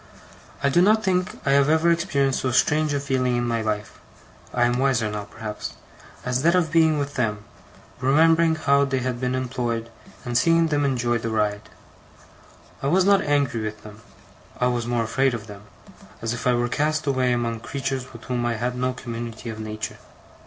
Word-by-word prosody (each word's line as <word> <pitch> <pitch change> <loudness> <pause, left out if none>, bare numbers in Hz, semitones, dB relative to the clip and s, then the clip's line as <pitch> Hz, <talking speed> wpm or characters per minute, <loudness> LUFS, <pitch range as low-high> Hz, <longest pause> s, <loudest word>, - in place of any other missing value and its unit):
I 140 - +4
do 170 +6 +4
not 215 +3 +4
think 185 +2 0
I 140 - +2
have 140 +1 +4
ever 160 +2 +4
experienced 140 -6 +1
so 130 - -1
strange 150 +5 +2
a 145 - 0
feeling 130 -3 0
in 120 0 0
my 115 -1 0
life 105 -2 -3 0.5
(I 120 - +1
am 120 +1 +1
wiser 130 -5 +2
now, 105 -1 -4
perhaps) 105 0 -7 0.5
as 125 +1 0
that 170 +4 +4
of 170 -4 +1
being 160 -2 +4
with 140 0 -3
them, 105 -5 -1 0.6
remembering 160 +5 +4
how 140 -2 +3
they 135 -1 0
had 125 -1 -3
been 125 0 0
employed, 120 -3 -3 0.3
and 120 -1 -3
seeing 165 +6 +4
them 145 -1 +1
enjoy 120 -3 0
the 115 - -3
ride. 105 -1 -1 1.1
I 135 - -1
was 180 +5 +3
not 200 0 +5
angry 140 -6 +1
with 110 0 -5
them; 105 +1 -12 0.6
I 125 - +2
was 120 -1 -2
more 120 -1 0
afraid 130 +3 +1
of 110 -2 -7
them, 105 -1 -11 0.5
as 115 +1 -2
if 120 - -3
I 125 - +4
were 120 0 +1
cast 155 +4 0
away 130 -3 +1
among 120 -2 -1
creatures 135 +1 -4
with 115 - -12
whom 125 -1 -2
I 120 -1 0
had 125 +3 -2
no 125 +1 -1
community 115 -1 -6
of 110 - -8
nature. 110 0 -5
125 Hz, 195 wpm, -24 LUFS, 115-145 Hz, 1.1 s, not